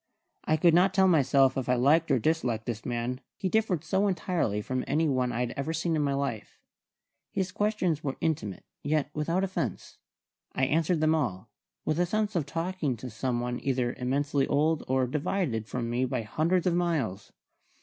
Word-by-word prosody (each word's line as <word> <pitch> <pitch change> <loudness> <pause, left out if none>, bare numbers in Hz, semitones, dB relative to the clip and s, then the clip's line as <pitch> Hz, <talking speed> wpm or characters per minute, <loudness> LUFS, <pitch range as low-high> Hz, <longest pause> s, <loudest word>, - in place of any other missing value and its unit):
I 155 - +2
could 170 +1 +4
not 185 +3 +4
tell 190 -1 +5
myself 135 -5 +4
if 130 -2 -2
I 125 - +4
liked 150 +7 +3
or 135 - +4
disliked 120 -4 0
the 115 -2 -3
man, 120 +2 -2 0.2
he 190 - -1
differed 195 -6 +1
so 190 +5 +1
entirely 170 - 0
from 130 +4 -2
any 155 +4 +2
one 130 -3 +1
I 120 - -2
had 120 -1 -1
ever 140 +4 -3
seen 165 +1 0
in 155 - +1
my 140 -1 +1
life. 135 -6 -3 0.7
His 190 -1 -2
questions 185 -7 0
were 135 -2 -3
intimate, 155 - -2 0.2
yet 150 0 0
without 165 +5 0
offence. 190 -1 -4 0.6
I 130 - +2
answered 160 +3 +1
them 155 0 +4
all, 110 - -2 0.3
with 155 +1 0
a 175 - +2
sense 215 +2 -1
of 155 -5 0
talking 165 -5 -2
to 125 +2 -7
some 120 +2 -1
one 125 0 -3
either 125 -2 0
immensely 140 +2 0
old 155 +2 +1
or 130 0 +2
divided 135 - -1
from 120 -1 -3
me 120 +2 0
by 125 -2 -2
hundreds 165 +10 0
of 180 - +2
miles. 155 - -1
145 Hz, 190 wpm, -28 LUFS, 125-170 Hz, 0.7 s, tell